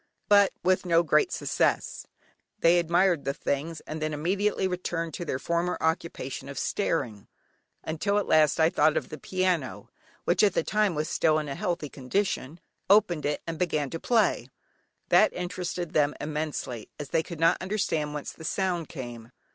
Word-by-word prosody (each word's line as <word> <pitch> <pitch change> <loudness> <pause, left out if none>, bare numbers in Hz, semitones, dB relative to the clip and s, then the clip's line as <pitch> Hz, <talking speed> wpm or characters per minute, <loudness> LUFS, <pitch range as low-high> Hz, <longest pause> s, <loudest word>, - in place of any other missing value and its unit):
But 200 -1 +6
with 185 0 +2
no 170 -2 +3
great 365 - +3
success; - - -1 0.5
they 175 -3 +4
admired 175 -1 +2
the 140 0 -2
things 155 +3 -3
and 155 0 -7
then 155 -1 -1
immediately 190 +5 0
returned 175 -3 -3
to 175 - -5
their 130 - -2
former 170 +5 -1
occupation 160 -5 -2
of 140 - -8
staring, 120 - -2 0.6
until 190 +6 -1
at 205 - +1
last 155 0 +4
I 160 +1 +4
thought 150 +1 +3
of - - -3
the 155 - -8
piano 180 -6 -1 0.3
(which 175 +1 +2
at 200 -3 +3
that - - +1
time 210 -4 +1
was 155 +1 -1
still 155 -1 +2
in 155 -1 -2
a 140 - -3
healthy 175 -3 -2
condition), 145 +2 -2 0.3
opened 180 -7 +4
it, 150 - -2
and 165 -1 -5
began 155 -6 0
to 165 - -4
play. 230 +2 +1 0.6
That - - +5
interested 180 -1 -4
them 150 -1 +2
immensely, 150 -6 -4
as 145 -2 -6
they 165 - +2
could 165 0 -9
not 165 0 +3
understand 185 -7 -1
whence 150 - -5
the 160 - -13
sound 175 -1 -1
came. 120 -5 -8
165 Hz, 170 wpm, -27 LUFS, 150-185 Hz, 0.6 s, But